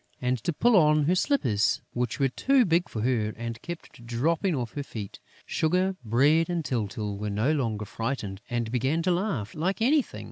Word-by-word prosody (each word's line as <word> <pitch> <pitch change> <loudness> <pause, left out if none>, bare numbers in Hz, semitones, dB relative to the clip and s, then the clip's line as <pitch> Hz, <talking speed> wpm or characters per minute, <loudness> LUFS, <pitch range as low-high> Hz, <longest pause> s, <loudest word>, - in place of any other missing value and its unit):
and 125 0 0
to - - 0
pull 235 +9 +3
on 150 -4 +5
her 165 +5 +2
slippers, 130 - +1
which 120 +2 -2
were 135 - +4
too 255 - +3
big 175 0 +1
for 110 - -4
her 115 -4 0
and 115 0 -5
kept 170 -8 -9
dropping 155 +10 0
off 120 -3 -3
her 145 - -3
feet. 110 -7 -7 0.3
Sugar, 185 +4 +1
Bread 145 +9 +3
and 170 -3 -2
Tyltyl 105 -5 -3
were 105 0 -3
no 110 +8 +1
longer 115 -8 -1
frightened 105 -3 -4
and 120 -2 -2
began 135 +7 0
to 180 - +2
laugh 175 - -1
like 180 +5 -1
anything. 270 +5 +2
135 Hz, 185 wpm, -27 LUFS, 115-170 Hz, 0.3 s, on